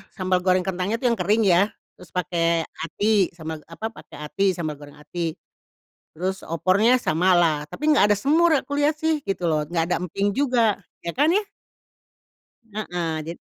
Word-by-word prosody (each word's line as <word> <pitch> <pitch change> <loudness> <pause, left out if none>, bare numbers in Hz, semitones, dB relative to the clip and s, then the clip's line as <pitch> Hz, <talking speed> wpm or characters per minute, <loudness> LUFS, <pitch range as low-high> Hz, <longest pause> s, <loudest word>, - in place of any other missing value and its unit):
sambal 185 -2 +1
goreng 185 -1 +2
kentangnya 190 +3 -1
tuh 250 - +1
yang 230 - -5
kering 205 +5 +2
ya, 185 +3 +4 0.3
terus 180 - -15
pakai 170 -2 0 0.2
hati, 165 +5 -3 0.3
sambal, 160 -1 -5
apa, 170 +6 -7
pakai - - -12
hati, 195 - -2
sambal 155 -3 -3
goreng 145 0 -13
hati, 150 +4 -9 1.0
terus 185 +4 -3
opornya 190 - +2
samalah, 165 -6 +2
tapi 295 - -9
enggak 280 - +5
ada 205 - +3
semur, 320 +8 +3
aku 275 - -7
lihat 295 +1 +2
sih, 315 0 0
gitu 195 -2 -2
loh. 155 -1 +2
Enggak 170 -1 0
ada - - +3
emping 195 +3 -1
juga, 245 -6 +2 0.3
ya 170 - -1
kan, 290 +4 +3
ya? 415 - +3 1.3
Heeh, 175 -6 -3
jadi 170 +2 -6
185 Hz, 170 wpm, -23 LUFS, 165-220 Hz, 1.3 s, enggak